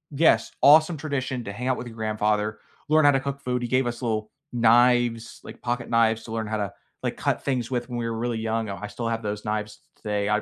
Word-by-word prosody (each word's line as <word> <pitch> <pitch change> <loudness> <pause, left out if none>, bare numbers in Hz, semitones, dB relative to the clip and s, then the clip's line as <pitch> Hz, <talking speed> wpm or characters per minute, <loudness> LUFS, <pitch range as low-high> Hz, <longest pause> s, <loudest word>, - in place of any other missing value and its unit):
Yes, 160 +4 +4
awesome 155 +3 +7
tradition 135 -4 -3
to 100 - -4
hang 125 +5 -4
out 130 - +2
with 125 - -6
your 115 - -10
grandfather, 105 -1 0 0.3
learn 155 0 +5
how - - +8
to 135 - +2
cook 140 +1 -5
food. 125 -2 -1
He - - -1
gave 130 +1 +2
us 120 0 -4
little 110 -3 -1 0.2
knives, 120 0 +3
like - - -10
pocketknives 115 -2 +1
to 110 - -9
learn 110 -1 -2
how 110 0 -2
to, 100 -2 -3 0.3
like, - - -2
cut - - -1
things 130 -3 -1
with 120 0 -2
when 120 - -4
we 115 - -2
were 115 - -3
really 120 0 -1
young. 110 -1 -1
Oh, 100 - -4
I - - -4
still 115 +2 -5
have 115 0 -2
those 105 0 -3
knives 105 0 -2
t - - -34 0.2
today. 105 -1 -1
I 105 0 +2
115 Hz, 250 wpm, -25 LUFS, 110-125 Hz, 0.3 s, how